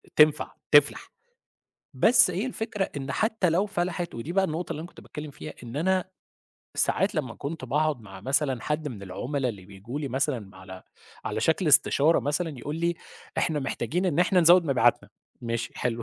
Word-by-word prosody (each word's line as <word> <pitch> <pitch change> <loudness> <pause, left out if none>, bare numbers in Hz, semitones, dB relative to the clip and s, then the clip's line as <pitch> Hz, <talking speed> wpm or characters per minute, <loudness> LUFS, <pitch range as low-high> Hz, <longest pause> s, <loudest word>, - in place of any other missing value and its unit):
تنفع، 150 -1 +4 0.2
تفلح. - - +4 0.8
بس 230 -5 +5
هي 190 +8 -2
الفكرة 220 -5 -3
إن 135 0 -4
حتى 220 -5 +1
لو 180 +5 +2
فلحِت، 175 -3 -3
ودي 130 +8 -5
بقى 195 +1 +3
النقطة 165 0 -3
اللي 150 - -6
أنا 170 - -8
كنت - - -15
باتكلم 150 0 -8
فيها، 150 +2 -9
إن 120 +2 -8
أنا 185 +4 +1 0.7
ساعات 195 - +1
لمّا 130 -8 -2
كنت 145 0 -6
بأقعد 150 +1 0
مع 95 -3 -12
مثلًا 135 +1 0
حد 150 0 -2
من 110 -7 -8
العُملا 125 +8 -3
اللي 100 -5 -7
بييجوا 105 +8 -7
لي 140 - -3
مثلًا 135 +1 0
مع 95 -2 -14
على 95 0 -11 0.4
على - - -2
شكل - - +1
استشارة 155 +4 +5
مثلًا 150 -1 -2
يقول 150 +5 -5
لي: 170 +1 0 0.4
"إحنا 155 -4 0
محتاجين 175 +6 -2
إن 170 -4 0
إحنا 180 +1 +4
نزوّد 175 +1 +6
مبيعاتنا." 135 -5 +2 0.3
ماشي، 115 -1 -3
حلو 115 -1 -2
150 Hz, 180 wpm, -26 LUFS, 125-175 Hz, 0.8 s, نزوّد